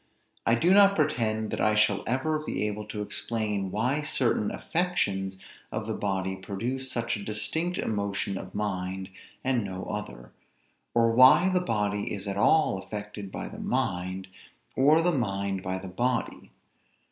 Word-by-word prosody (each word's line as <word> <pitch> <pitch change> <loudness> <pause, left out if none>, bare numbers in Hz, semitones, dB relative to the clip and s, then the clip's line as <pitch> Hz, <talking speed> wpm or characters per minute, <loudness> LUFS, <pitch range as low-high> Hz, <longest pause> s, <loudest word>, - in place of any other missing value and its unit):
I 115 - +5
do 170 +10 +4
not 200 0 +7
pretend 115 - 0
that - - -2
I 110 0 +3
shall 105 -2 +3
ever 135 +6 0
be 150 -8 -2
able 105 0 -3
to 105 -1 -4
explain 105 -2 -2
why 125 +9 0
certain 125 -7 +1
affections 100 - -1 0.3
of - - -3
the - - -2
body 95 -1 -1
produce 115 +8 -3
such 115 -1 -1
a 105 - -6
distinct 110 - -2
emotion 100 -2 -1
of - - -7
mind, 95 -2 -3 0.3
and 130 -3 +1
no 95 -1 -5
other; - - -6 0.6
or 115 -1 +4
why 130 +10 +7
the 185 -1 +2
body 105 -8 -1
is 100 0 -4
at 100 - -2
all 105 0 +3
affected 105 0 -7
by - - -5
the - - -9
mind, 95 +1 -1 0.5
or 150 +5 +5
the 175 - +3
mind 100 - -1
by 95 0 -2
the 95 - -7
body. 120 +7 -2
105 Hz, 160 wpm, -28 LUFS, 95-130 Hz, 0.6 s, not